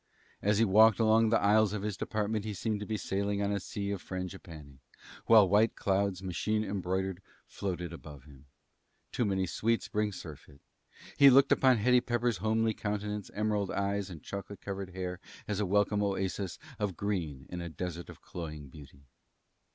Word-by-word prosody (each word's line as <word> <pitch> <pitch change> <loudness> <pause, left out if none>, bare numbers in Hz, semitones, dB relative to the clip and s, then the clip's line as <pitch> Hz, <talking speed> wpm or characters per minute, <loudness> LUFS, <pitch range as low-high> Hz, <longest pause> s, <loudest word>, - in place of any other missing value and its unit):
As 105 0 +2
he 115 - +4
walked 110 +2 +6
along 110 0 +4
the 115 - +3
aisles 105 0 +3
of 105 -2 -3
his 105 -2 -2
department 105 +2 -2
he 105 -1 -4
seemed 110 +1 -2
to 105 - -6
be 110 - -1
sailing 100 0 -2
on 100 0 0
a 100 - 0
sea 100 +1 -4
of 100 -3 -4
frangipanni, 85 -7 -8 0.5
while 110 -4 +7
white 105 +4 +3
clouds, 95 -1 0
machine 105 +4 -1
embroidered, 95 -2 -2 0.2
floated 90 -3 -4
around 75 -5 -11
him. 70 -1 -17 0.7
Too 120 - 0
many 95 -2 0
sweets 115 +6 0
bring 105 0 -1
surfeit. 75 -5 -11 0.6
He 140 -1 +10
looked 135 +1 +6
upon 130 -2 +5
Hetty 125 +3 +4
Pepper's 120 -3 0
homely 110 +3 +1
countenance, 105 -1 -4
emerald 105 -2 0
eyes, 100 0 -1
and 80 -5 -10
chocolate 100 0 -7
colored 95 -2 -6
hair 90 -1 -4 0.3
as 105 -2 -2
a 105 - 0
welcome 105 +2 +2
oasis 95 -2 -2 0.2
of 105 -5 -2
green 85 -10 -3
in 90 -1 -4
a 85 - -5
desert 85 +1 -6
of - - -13
cloying 75 -5 -7
beauty. 70 0 -14
100 Hz, 175 wpm, -31 LUFS, 90-105 Hz, 0.7 s, He